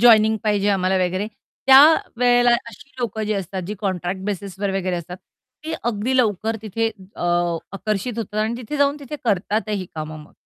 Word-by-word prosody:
Joining 220 -2 +6
पाहिजे 205 -1 +2
आम्हाला 190 -1 +2
वगैरे 185 +3 -1 0.4
त्यावेळेला 250 -4 +6 0.2
अशी 230 +5 -14
लोकं 220 -3 -2
जी 215 - 0
असतात 190 -1 -3
जी 210 - -4
कॉन्ट्रॅक्ट 190 -1 -2
बेसिसवर 200 0 -3
वगैरे 185 -2 -1
असतात 175 +1 -6 0.5
ते 320 - -4
अगदी 240 +2 0
लवकर 220 -2 +1
तिथे 225 +1 -1 0.3
अ, - - -6 0.5
आकर्षित 215 +4 -2
होतात 215 -1 -4
आणि 225 +2 -1
तिथे 250 +4 -5
जाऊन 285 0 +3
तिथे 285 +2 -6
करतातही 210 -1 0
कामं 155 0 -5
मग. - - -21
210 Hz, 160 wpm, -22 LUFS, 190-235 Hz, 0.5 s, Joining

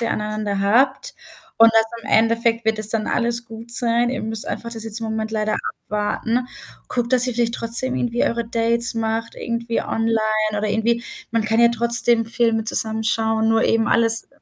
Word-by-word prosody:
ihr 230 - -1
aneinander 210 -1 -2
habt. 260 - +1 0.4
Und 230 0 +8
das 225 0 +4 0.2
im - - -7
Endeffekt 230 +1 +2
wird 220 -1 +1
es 215 - -2
dann 220 -1 -1
alles 235 0 -1
gut 225 +1 -10
sein. 240 0 +1
Ihr 265 - -4
müsst 220 0 -2
einfach 235 - -5
das 225 -1 -6
jetzt 225 0 0
im 225 - -4
Moment 220 0 -3
leider 215 -1 -1 0.3
abwarten. 225 +4 -1 0.4
Guckt, 240 0 -2
dass 255 0 +3
ihr 250 - -1
vielleicht 235 0 0
trotzdem 235 +3 -1
irgendwie 240 0 0
eure 235 0 -2
Dates 230 0 0
macht, 225 0 -2
irgendwie 235 0 -3
online, 225 0 0 0.4
oder 210 +1 -1
irgendwie 230 +3 0 0.3
man 230 -2 0
kann 225 +2 +1
ja 235 - +6
trotzdem 235 0 +2
Filme 230 -1 0
zusammen 220 0 +2
schauen, 220 0 +1
nur 225 0 +3
eben 225 0 +1
alles 230 0 +3
230 Hz, 185 wpm, -21 LUFS, 220-235 Hz, 0.4 s, Und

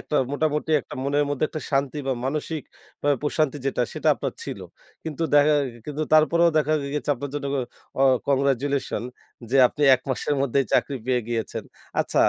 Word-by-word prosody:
একটা 150 - -2 0.2
মোটামুটি 150 +1 0
একটা - - -10
মনের 145 +2 +1
মধ্যে 145 +1 0
একটা 155 - -5
শান্তি 140 +1 0
বা 135 - +1
মানসিক 150 +2 -2 0.4
অ্যা 145 - +2
প্রশান্তি 150 -1 0
যেটা 135 -2 +1
সেটা - - 0
আপনার - - -4
ছিল। - - -6 0.4
কিন্তু 160 0 -4
দেখা 145 +1 +6 0.3
কিন্তু 150 +1 -3
তারপরেও 170 +2 +5
দেখা 155 0 +2 0.2
গেছে 150 0 -1
আপনার 140 +2 -6
জন্য 145 -1 -3 0.5
আ - - +5 0.3
কংগ্রাচুলেশন 140 0 +1 0.5
যে 135 - +3
আপনি 150 - -5
১ 130 - -3
মাসের 145 +3 0
মধ্যেই 135 0 +2
চাকরি 140 - +2
পেয়ে 125 -1 +2
গিয়েছেন। 115 -3 -3 0.4
আচ্ছা - - +1
145 Hz, 165 wpm, -24 LUFS, 135-150 Hz, 0.5 s, দেখা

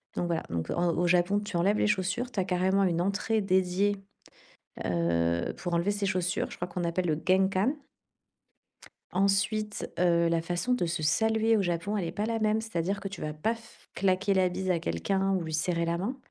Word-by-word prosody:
Donc 175 - -1
voilà, 170 -2 -1
donc 80 -1 -3
en 170 -1 +1
au 175 - +1
Japon, 180 +3 +3
tu 205 -3 -4
enlèves 195 +5 +2
les - - +2
chaussures. 210 +4 -1
Tu 210 - -3
as - - +2
carrément 190 +2 +2
une 170 -3 +1
entrée 200 +4 0
dédiée, 190 +1 +1 0.9
heu, 85 -1 0
pour 175 -2 -4
enlever 170 +4 +2
ses 205 0 -2
chaussures. 180 -1 -1
Je - - -8
crois 175 - -4
qu'on 175 0 -3
appelle 175 +2 -1
le 155 -1 0
genkan 190 +7 +3 1.4
ensuite, 200 +2 0
heu, 170 -1 +3
la 165 0 +2
façon 175 +9 -1
de 245 - 0
se 165 -1 -2
saluer 220 +8 +2
au 205 - +2
Japon, 175 +3 -1
elle 195 - -1
est 165 - -4
pas 210 +1 -2
la 230 0 -1
même, 215 0 +2
c'est-à-dire 200 -2 -2
que 200 - -4
tu 195 - -9
vas 150 - -3
pas 155 +10 -1
f 230 - -19
claquer 195 +1 +1
la 185 -1 +3
bise 185 +1 -3
à 175 - +2
quelqu'un 190 - 0
ou 185 - 0
lui 160 -1 -5
serrer 170 +2 0
la 170 0 -1
main. 220 +9 -3
185 Hz, 210 wpm, -29 LUFS, 170-205 Hz, 1.4 s, Japon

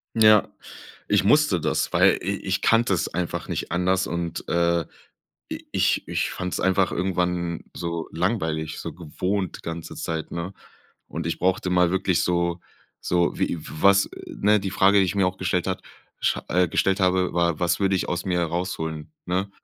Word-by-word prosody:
Ja, 110 -2 +6 0.6
ich - - +3
musste 115 - +4
das, 75 -1 0
weil 90 +2 +5
i 100 +3 -1
ich 95 0 0
kannte 115 -3 +3
es 85 - 0
einfach 90 +1 -3
nicht - - -4
anders 90 +2 +1
und, 85 -1 -4
äh, 85 0 +2 0.7
i - - -6
ich - - +1
ich - - -1
fand's 90 -1 -3
einfach 95 0 +2
irgendwann 90 -2 -1
so 85 -1 -3
langweilig, 80 -4 -1
so 85 - -6
gewohnt 90 +4 -3
die - - -16
ganze 85 0 -6
Zeit, 80 -2 -4
ne? 85 +3 -4 0.5
Und 80 +1 -5
ich 85 - -3
brauchte 95 0 +1
mal 90 -1 +4
wirklich 95 -2 +1
so 85 0 0 0.4
so 85 -1 +1
wie - - 0
w - - -11
was, 100 0 +6
äh, - - -10
ne? 105 +1 +4
Die 100 0 -3
Frage, 100 +2 +5
die 95 - +4
ich 90 - -2
mir 95 -2 +3
auch 90 +1 -4
gestellt 90 -1 -1
hat 95 - -2 0.4
sch - - +2
äh, 90 +1 +3
gestellt 95 +4 +1
habe, 95 -1 +2
war: 85 -2 +1
„Was 85 -1 +1
würde 95 -1 +2
ich 95 - -1
aus 90 0 -2
mir 90 -2 0
herausholen“, 80 -3 -3
ne? 95 +3 -1
90 Hz, 185 wpm, -24 LUFS, 85-95 Hz, 0.7 s, Ja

